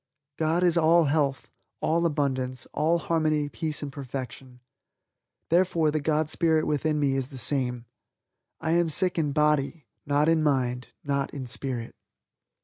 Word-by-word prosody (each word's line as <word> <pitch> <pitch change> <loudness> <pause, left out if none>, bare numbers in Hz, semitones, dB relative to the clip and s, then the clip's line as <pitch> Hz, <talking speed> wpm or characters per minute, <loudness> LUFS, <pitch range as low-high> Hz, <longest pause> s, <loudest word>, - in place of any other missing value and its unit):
God 165 +3 +1
is 175 -1 +3
all 165 +1 +5
health, 145 -2 0 0.3
all 170 +2 +1
abundance, 130 -4 -2
all 165 +3 +2
harmony, 155 -3 0
peace 155 -1 -3
and 145 - -5
perfection. 130 -1 -7 0.9
Therefore 170 -3 +2
the 155 - 0
God 150 +1 0
Spirit 160 0 +1
within 150 +1 0
me 140 -2 +1
is 135 -2 -2
the 135 - -11
same. 125 -2 +1 0.7
I 160 - -2
am 170 0 +2
sick 180 +3 +4
in 150 -3 0
body; 150 0 +1 0.2
not 145 +1 +2
in 165 -1 +3
mind, 130 -4 0 0.2
not 140 -1 -1
in 135 -2 -5
Spirit. 120 -1 -3
150 Hz, 145 wpm, -26 LUFS, 135-160 Hz, 0.9 s, all